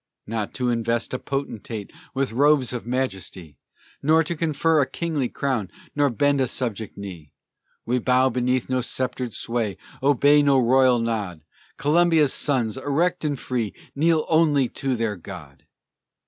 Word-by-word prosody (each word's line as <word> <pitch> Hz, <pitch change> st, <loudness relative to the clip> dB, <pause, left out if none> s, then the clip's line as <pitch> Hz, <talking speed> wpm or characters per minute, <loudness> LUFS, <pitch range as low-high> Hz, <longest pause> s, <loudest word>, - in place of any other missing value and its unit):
Not 110 Hz, -1 st, -4 dB
to 125 Hz, -2 st, 0 dB
invest 115 Hz, 0 st, -1 dB
a 130 Hz, -, -1 dB
potentate 115 Hz, -6 st, -5 dB, 0.2 s
With 135 Hz, -2 st, 0 dB
robes 140 Hz, 0 st, +3 dB
of 120 Hz, -2 st, -5 dB
majesty, 95 Hz, -, -4 dB, 0.4 s
Not 160 Hz, +2 st, +4 dB
to 170 Hz, -, -2 dB
confer 160 Hz, 0 st, +2 dB
a 135 Hz, -, 0 dB
kingly 155 Hz, -7 st, -2 dB
crown, 125 Hz, -9 st, -2 dB, 0.3 s
Nor 145 Hz, -1 st, +3 dB
bend 140 Hz, +4 st, +2 dB
a 130 Hz, -, +2 dB
subject 115 Hz, -4 st, -4 dB
knee. 90 Hz, -7 st, -9 dB, 0.5 s
We 125 Hz, +2 st, +1 dB
bow 130 Hz, +2 st, +3 dB
beneath 125 Hz, 0 st, 0 dB
no 130 Hz, 0 st, 0 dB
sceptred 125 Hz, 0 st, -3 dB
sway, 115 Hz, -3 st, -2 dB, 0.2 s
Obey 145 Hz, +2 st, +5 dB
no 140 Hz, -2 st, +4 dB
royal 130 Hz, 0 st, +4 dB
nod: 105 Hz, -8 st, -3 dB, 0.3 s
Columbia's 160 Hz, -1 st, +3 dB
sons, 125 Hz, -6 st, 0 dB
erect 160 Hz, +7 st, 0 dB
and 145 Hz, -3 st, -1 dB
free, 120 Hz, -5 st, -3 dB, 0.2 s
Kneel 160 Hz, +2 st, +2 dB
only 150 Hz, -5 st, +3 dB
to 135 Hz, -2 st, -2 dB
their 115 Hz, -3 st, -1 dB
God! 80 Hz, -6 st, -11 dB
130 Hz, 145 wpm, -24 LUFS, 115-145 Hz, 0.5 s, Obey